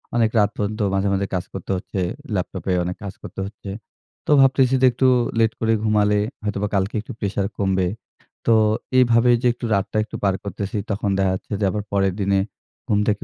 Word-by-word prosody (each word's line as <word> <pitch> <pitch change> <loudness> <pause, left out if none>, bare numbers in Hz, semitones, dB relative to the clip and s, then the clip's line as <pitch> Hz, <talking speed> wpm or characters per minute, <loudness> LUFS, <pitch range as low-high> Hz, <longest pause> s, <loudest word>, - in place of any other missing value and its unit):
অনেক 115 -2 +3
রাত 105 0 +4
পর্যন্ত 105 +1 -2
মাঝে, 95 +1 +1
মাঝে 100 0 0
কাজ 90 - -1
করতে 95 0 -5
হচ্ছে, 95 +1 -5 0.4
ল্যাপটপে 95 +1 -3
অনেক 90 +1 -3
কাজ 100 - -5
করতে - - -9
হচ্ছে। 100 0 -9 0.6
তো - - -1
ভাবতেছি 135 -1 +4
যে - - +6
একটু 130 +2 +2 0.3
লেট 110 -1 +4
করে 115 0 +2
ঘুমালে 105 -1 +3 0.2
হয়তোবা 105 0 -1
কালকে 95 +3 0
একটু 120 - -9
pressure 100 0 -1
কমবে। 95 -2 +1 0.6
তো 115 - +6 0.4
এইভাবে 120 -1 +5
যে 125 - +2
একটু 120 - -7
রাতটা 100 +2 -1
একটু 110 - -9
পার 100 -2 +2
করতেছি 100 +1 -4
তখন 100 +1 -1
দেখা 95 -1 +2
যাচ্ছে 95 - -6
যে - - +3
আবার 105 +1 -3
পরের 95 -2 +2
দিনে 100 0 +2 0.5
ঘুম 105 -1 +2
থেকে 105 -1 0
100 Hz, 190 wpm, -22 LUFS, 95-110 Hz, 0.6 s, যে